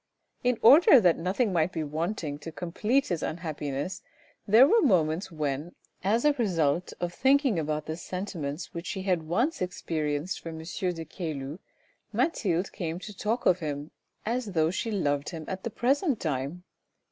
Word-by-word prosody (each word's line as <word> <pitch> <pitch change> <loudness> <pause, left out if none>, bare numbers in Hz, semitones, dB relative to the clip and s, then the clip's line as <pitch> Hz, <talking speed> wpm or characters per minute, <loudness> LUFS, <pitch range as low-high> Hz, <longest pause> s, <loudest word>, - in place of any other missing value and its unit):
In 250 -1 +2
order 280 +2 +9
that 175 -6 +3
nothing 190 +5 0
might 165 +1 +2
be 160 - -2
wanting 155 0 -3
to 165 - -7
complete 210 - 0
his 170 -4 -1
unhappiness 155 -1 -3 0.5
there 225 +6 +8
were 460 +7 +5
moments 175 - +2
when, 150 +1 -3 0.3
as 220 +7 +2
a 295 - +5
result 180 - 0
of 175 0 -2
thinking 265 - +3
about 155 0 -2
the 155 - -3
sentiments 170 -4 -5
which 170 +1 -6
she 190 - -3
had 180 -3 +1
once 220 - 0
experienced 155 -2 -2
for 165 - -7
M. 160 - -7
de 175 0 -3
Caylus, 155 -2 -5 0.5
Mathilde 190 - 0
came 165 -2 -4
to 205 +3 -9
talk 220 +5 -1
of 180 - +4
him, 150 -2 -4 0.3
as 230 -2 -2
though 160 -1 +2
she 215 +5 -2
loved 145 -9 0
him 160 -3 -7
at 190 0 -5
the - - -2
present 270 - +1
time. 150 +3 -3
175 Hz, 165 wpm, -28 LUFS, 155-210 Hz, 0.5 s, order